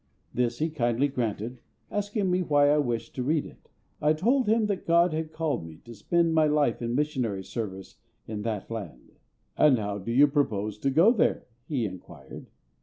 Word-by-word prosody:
This 120 -1 0
he 160 +4 -1
kindly 120 -2 +1
granted, 120 -1 -3 0.3
asking 205 -2 -1
me 180 +1 +2
why 145 -4 +3
I 150 - +3
wished 115 -4 -2
to 125 - -3
read 150 +3 +1
it. - - -15 0.3
I 150 +1 +4
told 235 - +1
him 220 +1 +3
that 200 -3 -3
GOD 170 0 +4
had 155 0 -3
called 155 - -2
me 80 -1 -10
to 120 - -10
spend 170 - +1
my 155 -1 +4
life 150 -6 +1
in 120 0 -2
missionary 125 -9 -1
service 95 -3 -6 0.3
in 110 -1 -5
that 110 -1 -4
land. 95 - -7 0.4
"And 145 -4 +5
how 105 -2 -3
do 100 +5 -5
you 135 +5 +6
propose 110 -8 -1
to 140 - 0
go 165 +11 +5
there?" 235 - +1 0.2
he 130 -7 -1
inquired. 85 -8 -10
135 Hz, 185 wpm, -27 LUFS, 110-160 Hz, 0.4 s, you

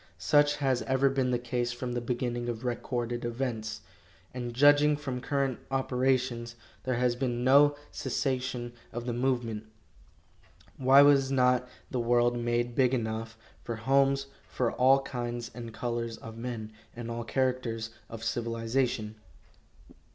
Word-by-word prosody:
Such 145 0 +3
has 135 -4 +1
ever 135 +1 +3
been 135 -2 +1
the 125 - +2
case 120 0 -2
from 125 0 -4
the 120 - -1
beginning 120 0 -2
of 120 +1 -5
recorded 120 -1 -2
events, 115 -3 -3 0.5
and 120 -1 -4
judging 145 +3 +5
from 130 -4 -4
current 135 -1 -1
operations, 130 -2 0 0.3
there 130 -1 0
has 125 0 +1
been 120 -1 -2
no 145 +3 +6 0.2
cessation 125 -3 -2 0.2
of 120 +1 -5
the 120 - -2
movement. 120 -3 -1 1.1
Why 135 +2 +7
was 140 -2 +5
not 125 -1 +3 0.2
the 125 - -1
world 120 0 +3
made 120 0 0
big 130 +1 +3
enough 110 -1 -3 0.3
for 115 - -4
homes 135 +3 +2 0.2
for 120 -3 -1
all 135 +2 +4
kinds 120 -2 -4
and 115 -1 -7
colors 115 0 -3
of 115 0 -10
men, 115 -2 -5 0.2
and 115 0 -6
all 115 0 -3
characters 120 -3 -1 0.2
of 115 -1 -8
civilization? 115 -1 -1
120 Hz, 140 wpm, -29 LUFS, 120-130 Hz, 1.1 s, Why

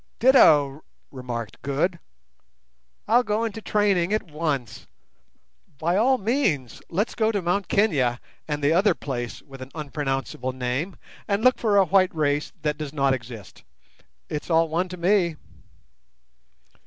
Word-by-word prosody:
"Ditto," 155 - +5 0.3
remarked 120 -5 -6
Good. 155 +6 -1 1.1
"I'll 235 +3 +5
go 220 -1 -1
into 220 -1 -4
training 205 -4 +1
at 215 - +1
once. 150 -7 -3 0.9
By 170 +5 0
all 255 +6 +3
means 200 - -1
let's 200 +7 -1
go 220 -1 +1
to 205 - -1
Mt 185 +2 -1
Kenia 135 - +2 0.3
and 150 -1 -3
the 145 +3 +4
other 195 +5 +3
place 120 -4 -5
with 135 -1 -13
an 130 - -8
unpronounceable 135 -4 -3
name, 130 +8 -3 0.3
and 205 +1 0
look 255 0 +4
for 210 -3 +2
a 195 - +6
white 185 0 +3
race 145 -1 0
that 150 0 -1
does 150 -2 -5
not 140 -2 +2
exist. 120 -6 -8 0.7
It's 150 +2 -5
all 165 -1 +3
one 175 +3 -1
to 180 - -7
me." 175 -2 +2
160 Hz, 140 wpm, -24 LUFS, 135-200 Hz, 1.1 s, a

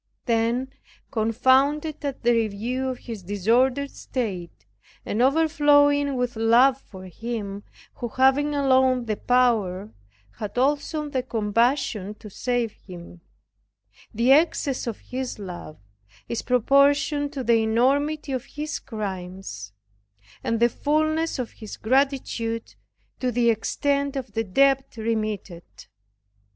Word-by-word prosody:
Then 235 +2 +1 0.4
confounded 270 +7 +2
at 280 -3 -4
the 240 +1 +4
review 230 +4 -1
of 255 - -4
his 230 -5 -8
disordered 240 +9 +1
state, 195 -9 -5 0.4
and 220 - -1
overflowing 290 -1 +4
with 250 -1 -1
love 240 +4 +4
for 190 -7 -12
Him, 205 0 -5 0.4
who 240 - -3
having 270 +4 +2
alone 260 -3 +3
the 215 -2 -1
power, 215 -6 +1 0.5
had 210 +2 -5
also 295 +3 0
the 265 -3 -1
compassion 220 -2 0
to 210 -1 -12
save 245 0 -1
him 175 -3 -12 0.9
the 235 +3 +2
excess 285 -3 +2
of 230 - -3
his 255 -1 -5
love 180 -6 -8 0.5
is 235 - -3
proportioned 280 +3 +3
to 270 -3 -4
the 230 -1 +3
enormity 275 +7 +1
of 260 -1 -3
his 300 +2 -5
crimes, 185 - -6 0.7
and 230 -1 0
the 235 - +5
fullness 310 +5 0
of 250 -3 -4
his 215 -3 -10
gratitude 245 -3 0 0.5
to 255 -1 0
the 235 0 +3
extent 280 +5 -1
of 265 -2 -5
the 225 - 0
debt 270 +7 +2
remitted. 215 -5 -3
245 Hz, 120 wpm, -24 LUFS, 220-275 Hz, 0.9 s, the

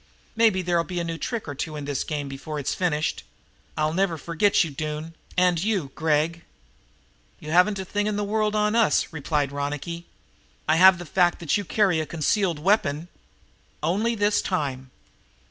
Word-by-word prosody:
"Maybe 220 -5 +3
there'll 175 -1 +1
be 175 +2 -4
a - - -1
new 165 -1 -4
trick 230 -6 -3
or 145 - -4
two 155 +3 -5
in 145 -1 -5
this 145 -2 -2
game 145 -2 -3
before 135 +3 -6
it's 140 - -2
finished. 155 -4 -1 0.5
I'll 155 0 +1
never 180 -2 +1
forget 170 +6 +2
you, 165 - -5
Doone, 155 +3 -5 0.2
and 180 -2 +3
you, 195 -10 -1
Gregg." 160 +2 0 1.0
"You 155 - -7
haven't 180 +4 +4
a 190 - -4
thing 205 +3 -1
in 210 - -1
the 205 - -1
world 215 +1 0
on 210 +1 +2
us," 230 -6 +2
replied 145 -2 -1
Ronicky. 150 +4 -4 0.6
"I 155 +1 +4
have 185 +1 +8
the 175 - -8
fact 175 +2 +2
that 165 -4 0
you 205 - 0
carry 185 -5 +2
concealed 170 +2 0
weapons." 165 -2 +1 0.7
"Only 210 +9 +1
this 205 -1 +2
time." 135 -8 -2
170 Hz, 175 wpm, -25 LUFS, 150-195 Hz, 1.0 s, have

